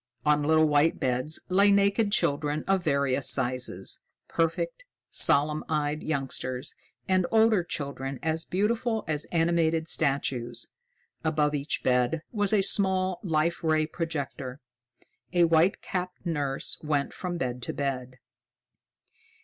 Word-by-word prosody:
On 150 0 +3
little 155 +1 +4
white 150 +2 +2
beds 130 +5 +1
lay 200 +2 +4
naked 200 +1 +3
children 150 -4 0
of 195 -2 +2
various 140 -3 +1
sizes, 125 -7 -1 0.3
perfect, - - -1 0.3
solemn 150 +2 +4
eyed 150 -1 -1
youngsters 135 -2 -3 0.3
and 185 -2 +2
older 220 -4 +4
children 140 -4 -5
as 160 0 0
beautiful 220 +4 -1
as 150 -1 -2
animated 165 -1 +1
statues. 135 -6 -1 0.5
Above 150 -2 +1
each 145 0 -2
bed 125 +5 +1
was 205 -3 +1
a 205 -3 +3
small 190 -2 +2
Life 170 -1 0
Ray 155 -1 +2
projector. 145 -5 -5 0.7
A 175 -1 +4
white 165 +3 +3
capped 180 0 -4
nurse 145 -5 -1
went 150 -2 -1
from 180 -2 -4
bed 125 -4 -3
to - - -3
bed. 130 -3 -4
155 Hz, 125 wpm, -27 LUFS, 140-180 Hz, 0.7 s, little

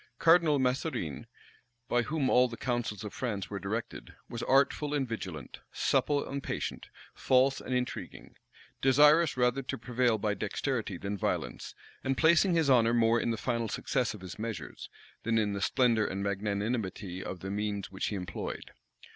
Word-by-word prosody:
Cardinal 165 -1 +5
Mazarine, 125 - -1 0.6
by 120 - +2
whom 140 +2 -1
all 125 0 +5
the 115 -1 -8
counsels 120 -4 -2
of 105 - -6
France 105 -8 -3
were 100 - -3
directed, 105 +4 -5
was 115 - -6
artful 140 +3 +2
and 135 -3 0
vigilant, 95 -9 -6
supple 145 -1 +1
and 140 +1 -4
patient, - - -4 0.3
false 130 +1 +2
and 130 - -3
intriguing; 125 0 -4 0.5
desirous 150 +3 +5
rather 125 +2 +2
to 135 +1 -4
prevail 120 -1 +1
by 105 0 0
dexterity 110 0 -2
than 100 +2 -4
violence, - - -3 0.3
and 135 0 0
placing 170 +2 +4
his 165 -3 +2
honor 120 -3 +4
more 115 0 +3
in - - -1
the 115 - -1
final 115 -1 -1
success 120 +2 -1
of 105 - -12
his 95 +2 -9
measures, 115 0 -6 0.3
than 115 0 0
in 105 -2 +1
the 100 - -3
splendor 115 -1 +2
and 95 +1 -3
magnanimity 100 -1 -2
of 90 - -6
the 95 - -5
means 105 -1 -3
which 95 - -2
he 105 - -2
employed. 90 -2 -5
115 Hz, 165 wpm, -30 LUFS, 105-135 Hz, 0.6 s, Cardinal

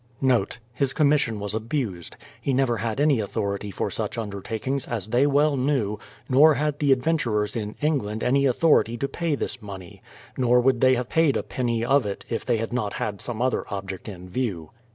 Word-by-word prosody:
As 120 - -34
to 120 +2 -6
my 130 - +5
writing - - +4
that - - -7
she 115 - -14 0.2
*His 135 -2 +1
commission 140 -7 +2
was 105 0 -4
abused; 110 - -3 0.2
he 140 - 0
never 130 -3 +2
had 115 +2 -3
any 145 -4 +3
authority 100 0 -2
for 95 - -3
such 120 - -3
undertakings, 110 +5 -3
as 110 -4 -4
they 125 +5 +3
well 145 +1 +3
knew, 125 -6 0 0.3
nor 145 +4 +6
had 150 0 -1
the 145 -2 +2
adventurers 125 -7 +1
in 105 -2 -4
England 110 -8 0
any 140 +2 +3
authority 130 -4 +3
to 140 - -1
pay 165 0 -1
this 130 -2 -3
money, 95 -4 -10 0.2
— - - -22
nor 125 -1 +4
would 125 -1 +2
they 130 0 +5
have 125 -1 -2
paid 160 -3 +3
a - - -2
penny 120 -2 -1
of 135 -3 +3
it 100 - -5
if 115 - -2
they 120 -2 +1
had 115 +1 -4
not 105 -5 -1
had 100 -2 -3
some 120 -1 -3
other 130 - +1
object 95 0 -5
in 90 -2 -9
view. 90 -7 -3
120 Hz, 215 wpm, -25 LUFS, 105-140 Hz, 0.3 s, nor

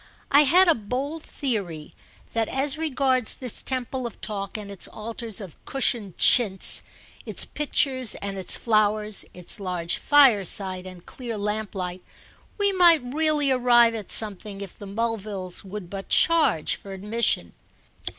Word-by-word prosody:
I 290 +1 +6
had 360 +7 +5
a 335 - +6
bold 265 +8 -4
theory 195 - -4 0.4
that 225 -1 0
as 270 +1 +1
regards 270 -6 +1
this 250 -4 -3
temple 255 -1 -3
of 230 - -12
talk 200 -1 -5
and 205 -1 -8
its 195 - -4
altars 225 0 -6
of 190 -7 -11
cushioned 235 -8 0
chintz, 205 -6 +4 0.4
its - - +2
pictures 265 -4 +1
and 200 0 -5
its 190 -2 0
flowers, 215 -1 +1
its 180 +4 -8
large 180 -3 -3
fireside 200 - +3
and 185 -1 -12
clear 235 -4 -7
lamplight, 200 -3 -4 0.6
we 405 -1 +2
might 335 -9 +4
really 305 -2 +2
arrive 240 -2 +4
at 215 -4 -6
something 205 -1 0
if 195 -3 -8
the 205 - -10
Mulvilles 205 -3 -4
would 195 -1 -8
but 195 +2 -8
charge 325 - +2
for 195 - -10
admission. 210 +5 -1
220 Hz, 140 wpm, -24 LUFS, 195-260 Hz, 0.6 s, I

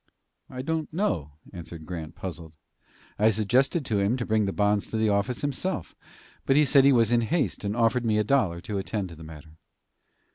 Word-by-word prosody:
"I 130 0 -6
don't 160 +1 -2
know," 85 - -1 0.2
answered 85 -2 -9
Grant, 80 -3 -7
puzzled. 80 -4 -8 0.6
"I 110 +2 +5
suggested 125 - +1
to 110 -5 0
him 100 +6 +1
to 120 - -3
bring 110 -1 +1
the 95 - -1
bonds 105 0 +1
to 110 - -4
the 110 0 +2
office 105 +5 0
himself, 145 - -3 0.5
but 135 - +4
he 150 +1 +5
said 140 -1 +5
he 140 - +7
was 115 -3 +3
in 120 -1 +4
haste, 120 - -1
and 100 +1 -2
offered 115 +1 +2
me 110 -2 +1
a 105 - +3
dollar 100 -8 +1
to 100 +1 -4
attend 95 0 -3
to 85 - -10
the 80 - -12
matter." 80 0 -13
110 Hz, 205 wpm, -26 LUFS, 90-130 Hz, 0.6 s, he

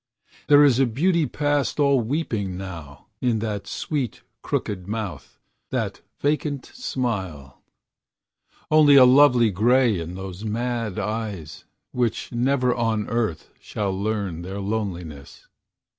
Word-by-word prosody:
There 145 0 +7
is 135 -4 +4
a 135 - +4
beauty 160 +6 +1
past 145 -1 -1
all 140 -2 +4
weeping 110 - -2
now 85 -7 -9 0.2
In 120 -3 +1
that 105 -2 -4
sweet, 140 -7 -3 0.2
crooked 95 -3 -3
mouth, 105 -3 -5 0.3
that - - -3 0.2
vacant 145 -1 -1
smile; 95 - -4 1.1
Only 150 -2 +7
a 130 -2 +9
lonely 125 -4 +6
grey 115 +1 +3
in 85 +2 -6
those 95 +1 -7
mad 115 -1 -2
eyes, 105 -8 -4 0.3
Which 120 -3 -1
never 125 +1 +1
on 115 -3 -1
earth 110 -10 -2
shall 100 -2 -3
learn 100 -3 -2
their 95 +3 -6
loneliness. 90 -9 -5
110 Hz, 120 wpm, -23 LUFS, 95-130 Hz, 1.1 s, a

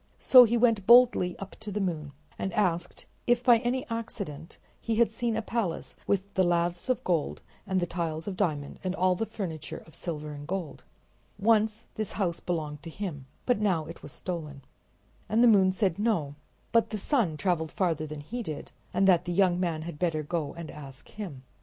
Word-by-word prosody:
So 255 -2 +8
he 235 +1 +1
went 225 -5 +3
boldly 235 -7 +6
up 195 0 -8
to 215 -1 -6
the 205 - -2
moon, 160 -7 -2 0.3
and 190 - -2
asked 175 -4 0 0.2
if 240 0 +3
by 240 -3 +6
any 245 +2 -1
accident 200 - -6 0.2
he 230 - -1
had 235 0 +3
seen 230 0 -1
a 225 - -2
palace 210 -7 -2
with 200 0 0
the 190 - +3
laths 175 +4 0
of 255 - +1
gold 170 -5 -1 0.2
and 190 -1 +1
the 175 - 0
tiles 165 -1 -3
of 200 - -3
diamond 150 -8 -2
and 185 0 -1
all 185 0 +3
the 220 +5 -2
furniture 160 -7 -5
of 160 - -17
silver 150 -3 -5
and 145 0 -8
gold. 185 -4 -4 0.5
Once 220 +1 +2
this 215 -2 -3
house 180 -4 -1
belonged 155 -4 -3
to 165 - -8
him, 160 -7 -6 0.2
but 245 -4 +2
now 185 -7 +1
it 165 +2 -10
was 145 - -9
stolen. 150 -6 -5 0.7
And 225 +3 +4
the - - +8
moon 195 -4 +6
said 190 -2 0
no, 205 -11 0 0.4
but 230 -1 +4
that - - -28
the 215 - -3
sun 205 - +1
traveled 160 0 0
farther 165 -5 0
than 150 -1 -7
he 240 +12 -5
did, 155 -9 -6 0.2
and 195 - +4
that 180 -2 +5
the 175 - -2
young 180 -1 +3
man 165 -4 -1
had 160 -3 -7
better 165 -4 0
go 155 -1 -3
and 170 -2 -7
ask 140 -3 -11
him. 175 -12 -7
180 Hz, 205 wpm, -28 LUFS, 160-215 Hz, 0.7 s, So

